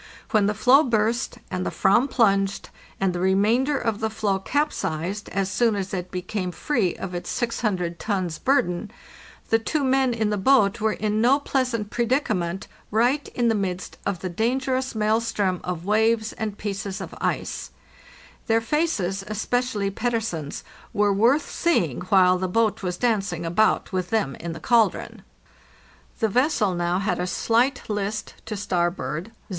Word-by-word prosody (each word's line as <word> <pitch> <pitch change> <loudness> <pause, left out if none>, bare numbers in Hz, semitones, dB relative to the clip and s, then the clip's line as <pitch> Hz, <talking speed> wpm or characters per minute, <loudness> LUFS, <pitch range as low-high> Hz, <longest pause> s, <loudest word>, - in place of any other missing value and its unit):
When 210 -3 +3
the 210 - 0
floe 255 +6 +6
burst, 235 -2 0
and 185 -1 -2
the - - -1
/vam 240 +8 +3
plunged, 195 -5 +1 0.3
and 195 -2 +1
the 175 - -3
remainder 215 +10 +2
of 225 -5 -1
the 220 - 0
floe 210 -3 -1
capsized 200 - -2
as 195 -1 -1
soon 230 -1 +2
as 195 -1 -4
it 180 -1 -3
became 185 0 -3
free 200 - 0
of 190 -1 -6
its 175 - -5
600 195 -8 -1
tons' 185 -6 -2
burden, 210 -7 +1 0.6
the 225 - +5
two 285 +6 -1
men 260 -2 +2
in 220 -2 0
the 210 - 0
boat 210 -2 +3
were 220 0 +2
in 215 0 -1
no 260 +5 +4
pleasant 250 -7 -1
predicament 220 -8 -1 0.2
right 245 +7 +2
in 240 -1 +2
the 225 - +3
midst 185 -3 -3
of 200 -4 -2
the 185 - -2
dangerous 255 +6 -1
mael 220 +1 +2
strom 195 -5 -1
of 175 -1 -4
waves 220 +1 +2
and 215 -2 -4
pieces 200 -1 -4
of - - -7
ice; - - -2 0.8
their 225 -1 +4
faces, 225 - -1
especially 215 -1 -1
Petter 230 +3 0
sen's, 165 -10 -5 0.3
were 205 0 +3
worth 245 +9 +3
seeing 175 - 0
while 185 -2 +5
the 185 - -1
boat 220 +3 +1
was 180 -2 -3
dancing 195 -8 0
about 215 +8 +2
with 185 -1 -1
them 210 -12 0
in 170 -1 -5
the 160 - -8
caldron. 230 +5 +1 1.0
The 220 - +1
vessel 230 - +2
now 175 0 0
had 195 0 -1
a 180 - -1
slight 240 +8 +1
list 210 0 -3
to 215 - -4
starboard 175 -4 -1
(0. 225 - -20
210 Hz, 165 wpm, -24 LUFS, 185-235 Hz, 1.0 s, floe